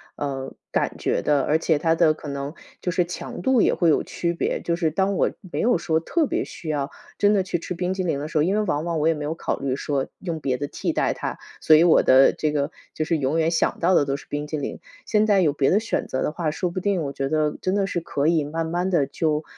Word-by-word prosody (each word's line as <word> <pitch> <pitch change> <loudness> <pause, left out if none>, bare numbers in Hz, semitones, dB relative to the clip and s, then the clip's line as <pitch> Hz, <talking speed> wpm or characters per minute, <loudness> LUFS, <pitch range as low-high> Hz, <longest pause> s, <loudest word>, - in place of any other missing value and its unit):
呃， 135 -2 -4 0.2
感 - - -1
觉 - - 0
的， 145 -2 +2
而 155 - +2
且 160 -2 +2
它 160 +2 +2
的 165 -2 +4
可 155 - -10
能 140 +1 -4 0.3
就 180 - -1
是 180 0 +1
强 175 0 -6
度 255 -1 +4
也 - - +3
会 170 - +3
有 155 - +3
区 170 0 -2
别， - - -1
就 170 - -1
是 170 -2 +1
当 190 +5 0
我 - - +2 0.2
没 - - 0
有 240 -3 +3
说 160 -1 0
特 320 - 0
别 - - -1
需 165 - -10
要 145 -2 -1 0.3
真 205 0 +4
的 195 - +2
去 175 -2 -2
吃 180 - -5
冰 180 +2 -1
淇 190 0 -2
淋 165 -5 0
的 145 - -4
时 155 0 -3
候 - - +4
因 190 +5 +1
为 215 - +2
往 155 -6 -1
往 165 -2 -1
我 155 - +2
也 165 - +4
没 150 -2 -5
有 155 +2 -2
考 - - -2
虑 135 -1 -1
说 140 -1 -2
用 170 -4 -4
别 130 -3 0
的 145 - -3
替 - - -2
代 - - +1
它， - - -5 0.2
所 155 - +6
以 155 - +6
我 170 - +6
的 130 +1 +6
这 155 - -1
个 145 +1 -1 0.2
就 155 - -1
是 165 +1 +1
永 140 +4 0
远 160 0 +2
想 165 - +1
到 180 +2 +3
的 150 - +5
都 140 0 -2
是 - - -13
冰 145 0 -3
激 155 - -3
凌。 145 - -4 0.3
现 215 -1 +2
在 205 -2 +4
有 155 -5 +2
别 140 -2 +2
的 200 - +4
选 225 - -2
择 130 - -2
的 - - 0
话， 160 -1 -2
说 180 +4 -2
不 185 - -3
定 190 -3 0
我 140 -1 -4
觉 135 0 -2
得 155 -1 +1
真 185 +1 0
的 200 -1 +2
是 175 - -1
可 145 -3 -2
以 165 -2 +3
慢 160 +3 -3
慢 175 +3 -1
地 170 -7 +2
就， 155 +1 -1
160 Hz, 305 characters per minute, -23 LUFS, 145-180 Hz, 0.3 s, 所